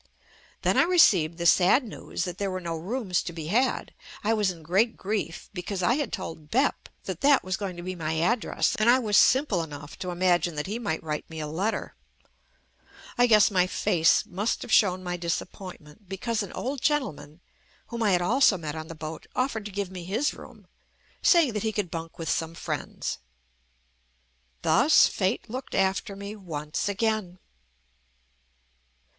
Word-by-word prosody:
Then - - +2
I - - +7
received 185 - +4
the 170 - -3
sad 185 +9 +5
news 225 - -5
that 180 -1 -5
there 200 -1 -1
were 185 0 -3
no 170 -2 -4
rooms 190 +2 -1
to - - -5
be 160 -2 -6
had. 250 +7 +1 0.3
I 220 +2 +2
was 210 -3 +2
in 170 -3 -7
great 195 +9 +1
grief 195 -4 -3
because 185 0 -4
I 235 - +4
had 280 -5 -1
told 160 -2 -6
"Bep" 265 +5 0
that - - -5
that 280 -1 +5
was 185 0 -1
going 195 -4 -5
to 175 - -7
be 185 +1 -4
my 160 -3 -3
address, 215 +9 +1
and 215 +2 +3
I 250 - +7
was 215 -5 0
simple 255 - +4
enough 145 -2 -8
to 180 - -4
imagine 175 -1 +1
that 150 - -3
he 215 +4 -4
might 200 -9 -3
write 150 -2 -4
me 160 -1 -7
a 155 - -3
let 170 +8 -1
ter. - - -4 1.2
I 245 0 +4
guess 215 -2 +6
my 185 -2 +3
face 165 -3 +2
must 200 +5 -2
have - - -8
shown 185 -3 +4
my 180 -1 -3
disappointment, 175 +1 -6
because 215 +4 -2
an 200 - -5
old 265 +1 -4
gentleman, 160 - -1 0.5
whom 235 0 -5
I 210 -3 +3
had 175 0 +2
also 225 0 +4
met 155 -3 -5
on 160 0 -6
the 165 - -8
boat, 155 +1 -7
offered 255 -5 -1
to 210 - -6
give 195 -1 -3
me 180 -2 -7
his 220 - 0
room, - - -13 0.6
saying 330 -9 +5
that 210 - -2
he 220 - 0
could 205 -5 -3
bunk 165 0 -6
with 165 - -5
some 165 +1 -1
friends. - - -4 1.4
Thus 285 +6 +6
fate 190 +3 -1
looked 255 +4 -6
after 195 +1 0
me 200 +1 -7
once 155 -3 -4
again. 205 -3 -1
190 Hz, 185 wpm, -27 LUFS, 170-220 Hz, 1.4 s, I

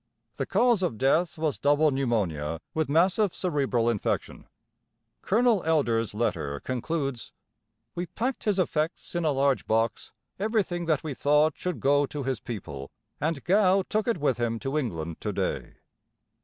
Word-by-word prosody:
The - - -2
cause 240 -5 +3
of 170 -12 -1
death 155 +8 +2
was 155 -3 -1
double 145 +2 +3
pneumonia 95 - -1
with 160 -2 -1
massive 180 +5 +3
cerebral 135 -9 0
infection. 115 -4 -2 0.7
Colonel 230 -1 +3
Elder's 120 -10 +1
letter 70 -10 -1
concludes: 135 0 -3 0.6
"We 175 +1 -4
packed 245 +8 -3
his 210 -3 +2
effects 165 -2 -1
in 175 -1 -1
a 155 - +3
large 140 -1 +1
box, 115 +1 0 0.3
everything 200 -5 0
that 155 -4 +1
we 155 -3 -3
thought 150 +3 +3
should 180 -3 -3
go 145 +1 +3
to 145 0 -5
his 130 -3 -2
people, 75 - -7 0.3
and 155 -1 -1
Gow 190 +1 +4
took 215 +2 -1
it 235 - +1
with 140 -6 0
him 115 -1 0
to 135 +2 -3
England 85 - -3
to - - -2
day." - - -3
145 Hz, 155 wpm, -27 LUFS, 120-175 Hz, 0.7 s, Gow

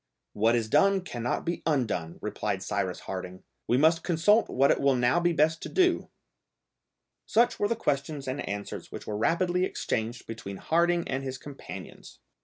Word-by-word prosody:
"What 115 +3 +3
is 115 -2 0
done 195 - +4
cannot 120 -9 -3
be 170 - -2
undone," 110 - -1
replied - - -2
Cyrus - - -2
Harding. 95 -1 -6 0.2
"We 120 - +3
must 160 +4 +4
consult 185 +6 +3
what 135 +2 +3
it - - +1
will 140 -1 +4
now 125 +6 +3
be 175 0 +2
best 160 0 +2
to - - -5
do." 365 -1 +2 1.2
Such 240 +2 +3
were 205 - +2
the 230 - 0
questions 145 -7 -2
and 130 +2 -2
answers 100 0 -5
which - - -7
were 105 - -4
rapidly 175 - +1
exchanged 115 -9 -2
between 105 -4 -7
Harding 170 - +1
and 130 0 -2
his 130 -1 -4
companions. 140 +1 -10
140 Hz, 170 wpm, -28 LUFS, 115-175 Hz, 1.2 s, done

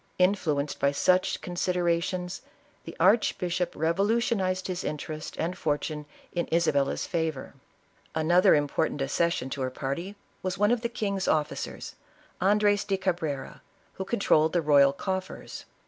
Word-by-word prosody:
Influenced 165 -7 +1
by 140 - +3
such 185 +6 +2
considerations, 180 +1 -1 0.4
the 165 - -8
arch 200 +7 +4
bishop 180 0 -2
revolutionized 190 +2 +1
his 180 -1 -3
interest 155 +1 -5
and 175 +3 -2
fortune 150 -2 -2 0.3
in 175 -1 -1
Isabel 160 -4 +2
la's - - -3
favor. 160 -5 -3 0.6
Another 170 +3 +5
important 145 +1 0
accession 135 -1 0
to 135 - -4
her 130 - 0
party, 140 +10 -4 0.3
was 185 0 -2
one 205 +3 +3
of 240 -2 +1
the 235 - -1
king's 200 -5 -2
officers, 150 -1 -2 0.5
Andres 205 +1 +3
do 195 - -1
Cabrera, 165 -7 -3 0.3
who 190 - -4
con 200 +4 -2
trolled 155 -5 +3
the 175 - +2
royal 140 -2 +6
coffers. 190 +6 -5
175 Hz, 140 wpm, -27 LUFS, 150-190 Hz, 0.6 s, royal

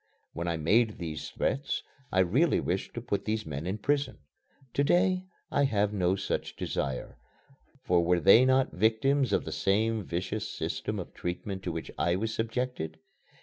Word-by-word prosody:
When 85 +2 -3
I 85 -1 0
made 110 +8 +3
these 80 -4 -5
threats, 135 +1 -1 0.3
I 95 - +4
really 130 - +3
wished 90 +2 -2
to 120 - -3
put 100 -4 -2
these 110 0 -1
men 75 +3 -4
in 95 +3 -1
prison. 140 +4 0 0.6
To 140 - +2
day 185 +4 +2 0.2
I 140 - +3
have 105 -5 +1
no 95 -2 +2
such - - -3
desire, 65 -3 -3 0.6
for 90 -5 +3
were 90 +1 +3
they 100 - +7
not 130 0 +3
victims 115 +5 +2
of - - +1
the - - -4
same 110 +2 +1
vicious 95 +5 -3
system - - -3
of - - -6
treatment 95 +2 -4
to 90 - -3
which 80 0 -5
I 85 - +2
was 110 +4 -2
subjected? 115 -9 -2
105 Hz, 170 wpm, -29 LUFS, 90-125 Hz, 0.6 s, they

